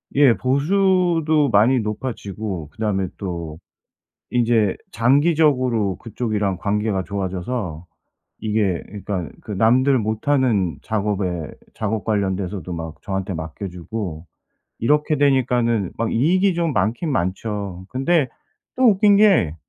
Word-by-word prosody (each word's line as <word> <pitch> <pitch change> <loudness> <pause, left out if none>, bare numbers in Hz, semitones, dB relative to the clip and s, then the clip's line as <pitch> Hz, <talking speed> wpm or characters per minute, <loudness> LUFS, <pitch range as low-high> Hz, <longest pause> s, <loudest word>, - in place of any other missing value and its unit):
예 140 -4 +6
보수도 165 +1 +2
많이 115 +6 +5
높아지고 105 - -4
그다음에 105 -4 -1
또 85 -5 -5 0.7
인제 115 -4 +2 0.2
장기적으로 130 - +2
그쪽이랑 105 -5 -2
관계가 105 0 -1
좋아져서 95 -2 -4 0.5
이게 105 -5 0 0.2
그러니까 90 -7 -3
그 - - -9
남들 125 +6 +3
못하는 110 - +1
작업에 100 -6 -2 0.3
작업 110 -1 -2
관련돼서도 95 -4 -2
막 80 -2 -6
저한테 95 0 -3
맡겨 80 +5 -6
주고 90 -2 -6 0.5
이렇게 150 +5 +2
되니까는 125 -7 +2
막 115 -1 -1
이익이 180 - +3
좀 170 -3 0
많긴 120 - 0
많죠. 95 -2 -3
근데 140 +3 +1 0.5
또 260 - +3
웃긴 205 0 +4
게 190 - +4
110 Hz, 260 characters per minute, -21 LUFS, 95-135 Hz, 0.7 s, 예